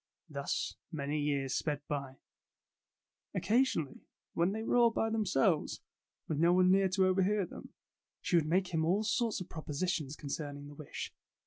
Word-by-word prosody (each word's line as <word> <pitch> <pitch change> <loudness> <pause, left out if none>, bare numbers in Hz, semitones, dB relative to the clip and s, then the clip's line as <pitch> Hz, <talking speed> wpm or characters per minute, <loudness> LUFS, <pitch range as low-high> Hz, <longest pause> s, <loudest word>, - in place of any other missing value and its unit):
Thus - - -3
many 150 -1 -2
years 140 -2 0
sped 145 -2 -1
by. 140 -2 -4 1.2
Oc - - -1
casionally, 220 - +1 0.3
when 170 +3 +2
they 220 +2 -3
were - - 0
all 240 -1 +6
by 225 0 0
themselves, 190 -7 +1 0.5
with 150 -2 -1
no 170 +2 +5
one 185 0 +5
near 195 0 +4
to 190 +1 +3
overhear 190 +2 +2
them, - - -10 0.5
she - - 0
would 160 -3 +3
make 180 +3 +2
him 160 -1 +2
all 185 +6 +2
sorts 225 0 +1
of 185 - -6
propositions 155 -1 -2
concerning 145 0 -5
the - - -10
wish. 145 -1 -7
170 Hz, 160 wpm, -33 LUFS, 145-195 Hz, 1.2 s, all